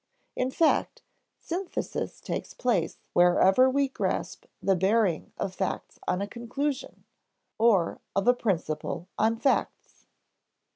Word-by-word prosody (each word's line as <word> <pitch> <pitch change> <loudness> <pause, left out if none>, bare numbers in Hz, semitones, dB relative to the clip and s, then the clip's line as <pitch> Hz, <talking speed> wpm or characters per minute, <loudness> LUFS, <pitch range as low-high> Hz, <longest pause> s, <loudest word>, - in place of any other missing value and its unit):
In 255 - 0
fact, 320 +4 +1 0.3
synthesis 355 +2 -4
takes - - -5
place 205 -10 0 0.2
wherever 190 +8 +5
we 275 +1 +2
grasp 265 - -3
the 195 - +2
bearing 190 -2 +1
of 190 - -3
facts 190 -1 -4
on 180 +2 0
a - - -4
conclusion, 255 +5 -4 0.6
or 210 -7 +3
of 195 +2 +1
a 245 - +7
principle 175 -6 -2
on 225 +1 +3
facts. 270 +3 -1
220 Hz, 115 wpm, -27 LUFS, 185-255 Hz, 0.6 s, a